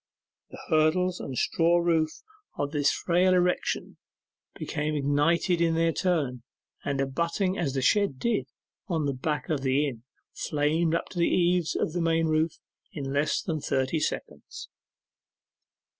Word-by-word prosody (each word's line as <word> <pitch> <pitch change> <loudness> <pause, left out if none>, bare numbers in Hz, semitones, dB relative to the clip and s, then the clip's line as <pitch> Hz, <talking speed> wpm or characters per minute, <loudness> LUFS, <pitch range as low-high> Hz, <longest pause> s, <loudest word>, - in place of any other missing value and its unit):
The - - -11
hurdles 170 +4 +2
and 130 -2 -6
straw 170 +6 +2
roof 165 -2 0 0.3
of 145 0 -2
the 145 -2 -1
frail 180 +5 +3
erection 180 0 0 0.6
became 150 +1 -2
ignited 150 +5 +2
in 165 -1 +2
their 165 0 +2
turn, 150 -10 0 0.4
and 140 -1 -2
abutting 170 +7 0
as 145 -8 -2
the 135 - 0
shed 200 -2 +2
did 230 - 0 0.4
on 165 -5 -1
the 140 - 0
back 135 +1 -3
of 150 -4 0
the 135 +2 +2
inn, 120 -5 -6 0.3
flamed 155 +3 0
up - - -2
to 175 - -6
the 170 - +3
eaves 175 -2 +2
of 155 - -1
the 175 - -1
main 165 0 +2
roof 155 0 +1 0.3
in 135 -3 -5
less 145 +2 +1
than 160 -4 -3
thirty 135 +4 0
seconds. - - -5
160 Hz, 150 wpm, -27 LUFS, 145-170 Hz, 0.6 s, frail